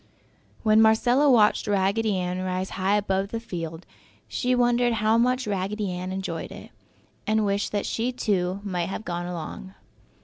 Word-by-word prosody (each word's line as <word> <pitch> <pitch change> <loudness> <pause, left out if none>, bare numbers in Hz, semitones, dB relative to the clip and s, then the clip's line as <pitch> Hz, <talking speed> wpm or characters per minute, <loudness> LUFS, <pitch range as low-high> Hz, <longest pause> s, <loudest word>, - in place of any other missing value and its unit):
When 215 0 +5
Marcella 245 +6 +4
watched 215 -5 +4
Raggedy 200 +1 +1
Ann 180 0 -2
rise 185 0 -2
high 195 +2 +1
above 195 -1 0
the 230 +3 -4
field, 165 -6 -6 0.4
she 250 0 0
wondered 240 0 +3
how 215 0 +2
much 250 +2 +2
Raggedy 200 0 -2
Ann 180 +1 -4
enjoyed 185 -4 -4
it, - - -11 0.6
and 215 0 +2
wished 200 0 -1
that 205 -1 -1
she, 235 +3 -1
too, 195 -6 -1
might 180 -4 -2
have 210 - -5
gone 175 0 -3
along. 180 +3 -7
200 Hz, 160 wpm, -25 LUFS, 185-225 Hz, 0.6 s, When